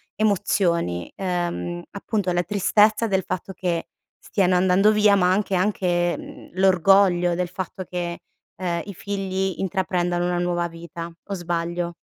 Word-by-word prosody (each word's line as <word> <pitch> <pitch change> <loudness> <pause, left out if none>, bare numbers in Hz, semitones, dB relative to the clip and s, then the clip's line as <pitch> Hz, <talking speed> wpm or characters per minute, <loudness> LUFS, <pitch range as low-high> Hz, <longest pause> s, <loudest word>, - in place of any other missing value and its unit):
emozioni: 180 - +1
ehm, 175 -2 -2
appunto 200 -2 -2
la 175 0 +1
tristezza 210 +3 +3
del 190 -2 +1
fatto 185 +1 -4
che 175 -3 -2 0.3
stiano 185 -2 +1
andando 190 +3 +4
via 210 -1 +5
ma 180 -1 +3
anche 195 0 +1
anche, 180 -3 +1
mhmm, - - -11
l'orgoglio 185 -1 +4
del 180 -1 -2
fatto 185 0 -5
che, 175 -1 -4 0.3
ehm, 175 -2 -2
i 200 - -7
figli 190 -1 -2
intraprendono 180 -2 0
una 175 0 0
nuova 175 -1 0
vita, 170 0 -8
o 200 - -5
sbaglio? 170 -1 -2
180 Hz, 140 wpm, -23 LUFS, 175-195 Hz, 0.3 s, via